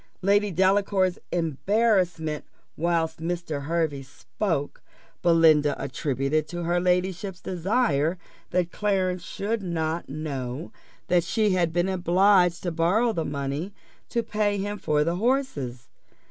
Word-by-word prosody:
Lady 205 +2 +3
Delacour's 190 0 +2
embarrassment 175 - +1 0.3
whilst 165 -1 0
Mr. 165 -4 -3
Hervey 160 -3 0
spoke, 145 +3 -4 0.4
Belinda 160 -4 +5
attributed 140 +2 -1
to 175 0 -5
her 175 +1 +1
ladyship's 180 +1 0
desire 180 - 0 0.3
that 175 -1 0
Clarence 185 -3 0
should 210 +5 -3
not 165 -2 -2
know 140 -1 -5 0.4
that 175 -1 +3
she 210 +4 +1
had 175 -3 +2
been 175 +2 +1
obliged 180 -1 +3
to 175 - -1
borrow 190 +9 +2
the 165 - -1
money 140 +6 -3 0.4
to 235 - 0
pay 210 -2 0
him 205 +1 -3
for 150 -4 +1
the 170 +3 -1
horses. 195 - -1
175 Hz, 120 wpm, -26 LUFS, 155-195 Hz, 0.4 s, Belinda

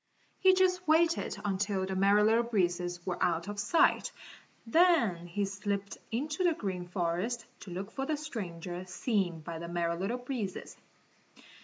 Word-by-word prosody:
He 375 0 +6
just 365 -1 +2
waited 330 +2 +3
until 195 -1 0
the 190 0 -3
Merry 200 +2 +4
Little 225 +2 +4
Breezes 175 -6 -1
were 180 -2 -3
out 170 +1 +1
of 205 0 -5
sight, 210 +11 +3 0.5
then 230 - +3
he 200 +4 -1
slipped 200 0 -3
into 300 +9 -2
the 345 -3 +3
Green 185 -6 -4
Forest 180 +7 -1
to - - -10
look 195 +4 -5
for 270 +2 -3
the 310 - 0
stranger 180 - -5
seen 185 -3 -1
by 165 +1 -6
the 170 - -6
Merry 170 -1 -1
Little 195 +8 -2
Breezes. 245 -7 -5
200 Hz, 155 wpm, -31 LUFS, 175-245 Hz, 0.5 s, He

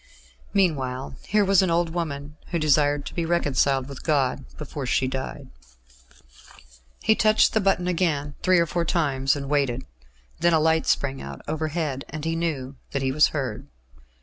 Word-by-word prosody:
Meanwhile 135 -9 0
here 210 +1 +3
was 195 -1 +5
an 190 - +1
old 170 0 +1
woman 150 -3 -4
who 170 - -2
desired 145 -2 +2
to - - -7
be 170 - -1
reconciled 140 -5 +1
with 140 -2 -9
God 135 -3 0
before 145 -2 -5
she 130 - +2
died.... 130 +1 -5 1.5
He 220 - +5
touched 215 0 +4
the 220 - +2
button 190 -2 +1
again, 160 -5 0
three 185 -1 +4
or 170 - +4
four 170 +2 -1
times, 140 -5 +1
and 140 -1 -5
waited. 135 -3 0 0.5
Then 170 0 +3
a 160 - +5
light 160 0 +2
sprang 135 -1 0
out 70 0 -8
overhead, 155 -3 -2
and 155 +1 -6
he 165 0 0
knew 145 -5 -3 0.2
that 140 -1 -1
he 130 - +1
was 150 +3 +5
heard. 130 -8 -4
150 Hz, 170 wpm, -25 LUFS, 135-170 Hz, 1.5 s, was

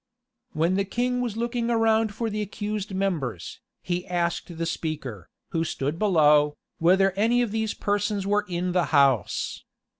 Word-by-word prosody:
[*] - - -57
When 170 +4 +1
the 200 - +2
king 245 +5 -1
was 235 -3 -3
looking 235 0 -1
around 225 -1 +2
for 230 - -2
the 210 +1 -2
accused 210 0 -4
members, 150 - -2 0.2
he 180 0 -2
asked 170 -1 -2
the 165 - -1
speaker, 145 - -4 0.2
who 165 -1 0
stood 150 0 -3
below, 150 -7 +4 0.2
whether 190 +3 +4
any 230 +6 +2
of 230 - -3
these 220 -1 -1
persons 205 -1 -1
were 205 +1 +1
in 180 +1 -1
the 180 -1 +2
house. 135 - +2
195 Hz, 160 wpm, -25 LUFS, 165-215 Hz, 0.2 s, below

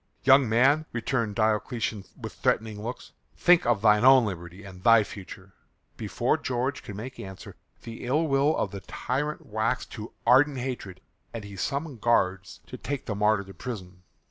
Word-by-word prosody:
"Young 135 -2 +6
man," 135 +7 +3
returned 115 -3 -1
Diocletian 110 -1 -1
with - - -7
threatening 110 -1 -1
looks, 120 +3 -7 0.3
"think 175 -5 +4
of 115 -4 +1
thine 105 0 +5
own 130 -2 +7
liberty 90 0 -7
and 95 -2 -11
thy 115 +1 +6
future." 95 -1 -11 0.4
Before - - 0
George 130 +3 -2
could 110 -6 -9
make 125 +6 -8
answer 95 -1 -9 0.3
the 115 0 -8
ill 145 +6 +1
will 140 +2 +2
of 100 - -1
the 100 -1 -7
tyrant 140 +10 -3
waxed 110 +3 -2
to 110 +1 -8
ardent 135 +4 +5
hatred 120 -8 -5 0.3
and 115 - -5
he 100 -1 -9
summoned 140 - -3
guards 95 -5 0
to - - -9
take 140 -2 -4
the 110 - -3
martyr 105 0 +2
to 95 0 -12
prison. 90 -3 -8
115 Hz, 170 wpm, -27 LUFS, 100-130 Hz, 0.4 s, own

